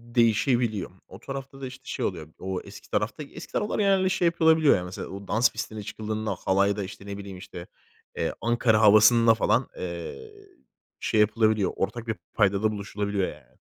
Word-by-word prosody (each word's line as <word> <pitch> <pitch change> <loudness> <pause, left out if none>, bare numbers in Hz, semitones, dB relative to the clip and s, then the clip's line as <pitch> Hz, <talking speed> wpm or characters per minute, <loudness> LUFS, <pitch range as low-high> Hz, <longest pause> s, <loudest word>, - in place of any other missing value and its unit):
değişebiliyor. 115 -3 +2 0.2
O 95 - -12
tarafta 135 +2 -7
da, 130 - -4
işte, 130 +1 -11
şey - - -3
oluyor. 80 -5 -4
O 95 0 -3
eski - - -13
tarafta 115 +8 -1
eski 160 +4 -11
tarafları 210 0 -1
genelde 190 -2 +3
şey 185 -1 +1
yapılabiliyor 160 -3 +4
ya, 90 - -2
mesela. 90 +1 -6
O 100 0 -9
dans 115 +2 +3
pistine 110 -1 -5
çıkıldığında 110 +1 -3
halayda, 100 +2 +2
işte, 100 +1 -9
ne 100 0 -6
bileyim, 100 -2 -8
işte, 85 -1 -9 0.5
eee, - - -1
Ankara 115 -2 +2
havasında 110 +2 +7
falan, 120 +3 +1
eee, 90 - -6 0.7
şey 110 - 0
yapılabiliyor. 110 -1 +3
Ortak 115 +4 -3
bir 110 - -1 0.2
paydada 105 +1 +2
buluşulabiliyor, 100 -1 -2
yani. 75 -5 -12
110 Hz, 170 wpm, -26 LUFS, 100-125 Hz, 0.7 s, havasında